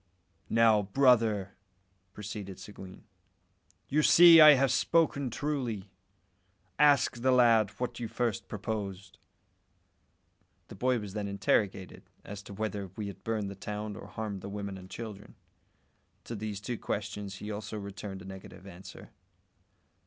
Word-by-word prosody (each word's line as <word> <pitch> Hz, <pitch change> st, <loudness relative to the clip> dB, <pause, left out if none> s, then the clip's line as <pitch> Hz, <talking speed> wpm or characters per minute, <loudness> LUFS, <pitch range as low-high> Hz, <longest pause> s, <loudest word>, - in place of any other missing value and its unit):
"Now, 115 Hz, -2 st, +4 dB
brother," 110 Hz, -3 st, +2 dB, 0.6 s
proceeded 100 Hz, -1 st, -7 dB
Seguin, 95 Hz, -2 st, -11 dB, 0.8 s
"you 150 Hz, +2 st, +2 dB
see 170 Hz, +1 st, +8 dB
I 150 Hz, -1 st, +10 dB
have 135 Hz, 0 st, +2 dB
spoken 145 Hz, -5 st, +1 dB
truly. 120 Hz, -7 st, -3 dB, 0.9 s
Ask 145 Hz, -4 st, +4 dB
the 130 Hz, +2 st, +1 dB
lad 115 Hz, -4 st, +4 dB
what 125 Hz, -1 st, -3 dB
you 120 Hz, -, -3 dB
first 115 Hz, -1 st, -2 dB
proposed." 100 Hz, -3 st, -5 dB, 1.5 s
The -, -, -10 dB
boy 130 Hz, 0 st, +1 dB
was 105 Hz, -4 st, -7 dB
then 105 Hz, -1 st, -3 dB
interrogated 100 Hz, -1 st, -1 dB, 0.2 s
as 100 Hz, 0 st, -8 dB
to 100 Hz, -, -11 dB
whether 105 Hz, -2 st, -3 dB
we 105 Hz, -, -4 dB
had 100 Hz, -2 st, -9 dB
burnt 110 Hz, -3 st, -2 dB
the 100 Hz, -, -6 dB
town 105 Hz, +1 st, -6 dB
or -, -, -10 dB
harmed 105 Hz, -3 st, -5 dB
the -, -, -7 dB
women 100 Hz, -1 st, -5 dB
and 95 Hz, 0 st, -11 dB
children. 105 Hz, -3 st, -9 dB, 0.9 s
To 115 Hz, -, -7 dB
these 105 Hz, -1 st, -5 dB
two 110 Hz, +3 st, -5 dB
questions 100 Hz, -1 st, -4 dB
he 105 Hz, +1 st, -7 dB
also 105 Hz, +1 st, -6 dB
returned 100 Hz, -1 st, -7 dB
a -, -, -13 dB
negative 95 Hz, -1 st, -11 dB
answer. 95 Hz, -1 st, -12 dB
105 Hz, 140 wpm, -30 LUFS, 100-120 Hz, 1.5 s, I